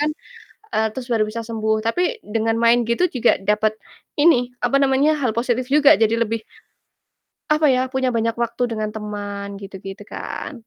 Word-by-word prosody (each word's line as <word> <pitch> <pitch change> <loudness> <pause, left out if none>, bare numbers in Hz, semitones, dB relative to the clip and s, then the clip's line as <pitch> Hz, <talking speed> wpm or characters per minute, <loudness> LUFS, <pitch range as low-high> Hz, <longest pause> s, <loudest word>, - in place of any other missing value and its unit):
kan, 295 - +2 0.7
eee, 220 - +2
terus 260 -1 -6
baru 220 -2 +2
bisa 230 +2 -5
sembuh. 220 -1 -1
Tapi, 355 - -1
dengan 225 +1 -1
main 235 +1 +4
gitu 235 +10 +2
juga 250 - +2
dapet 210 +2 +1 0.5
ini, 250 -6 +4
apa 275 - +2
namanya, 275 +3 +3
hal 255 -5 0
positif 240 +1 0
juga, 300 0 +6
jadi 220 0 +3
lebih, 225 0 -3 1.1
apa 305 0 +3
ya, 255 0 0
punya 260 -1 -1
banyak 230 0 0
waktu 235 +1 -1
dengan 215 -1 -3
teman, 205 -1 -6
gitu-gitu 195 0 -9
kan? - - -6
230 Hz, 165 wpm, -21 LUFS, 215-260 Hz, 1.1 s, juga